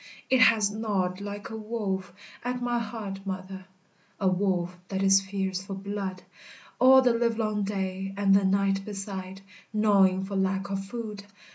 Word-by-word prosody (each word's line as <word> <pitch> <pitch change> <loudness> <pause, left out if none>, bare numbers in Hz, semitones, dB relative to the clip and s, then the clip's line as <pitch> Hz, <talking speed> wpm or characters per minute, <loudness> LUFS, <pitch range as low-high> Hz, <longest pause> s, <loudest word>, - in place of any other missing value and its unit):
It 260 -1 +5
has 220 -2 +5
gnawed 200 -4 -1
like 205 +1 -6
a - - -5
wolf, 210 -4 -3 0.3
at 250 +1 -2
my 240 -1 0
heart, 210 -4 -5
mother, 190 0 -6 0.5
A 195 - +1
wolf 185 -1 0
that 190 0 -2
is 195 0 +6
fierce 190 -1 -3
for 195 0 -6
blood; 195 -1 -5 0.6
All 260 +1 +8
the 245 -2 +4
livelong 225 -3 0
day, 195 -1 -3
and 200 -1 +4
the 200 - +4
night 195 0 +2
beside, 195 -2 -6 0.3
Gnawing 195 -3 +3
for 200 0 -5
lack 195 +1 0
of 195 0 -2
food. 210 -1 -6
195 Hz, 155 wpm, -27 LUFS, 190-215 Hz, 0.6 s, All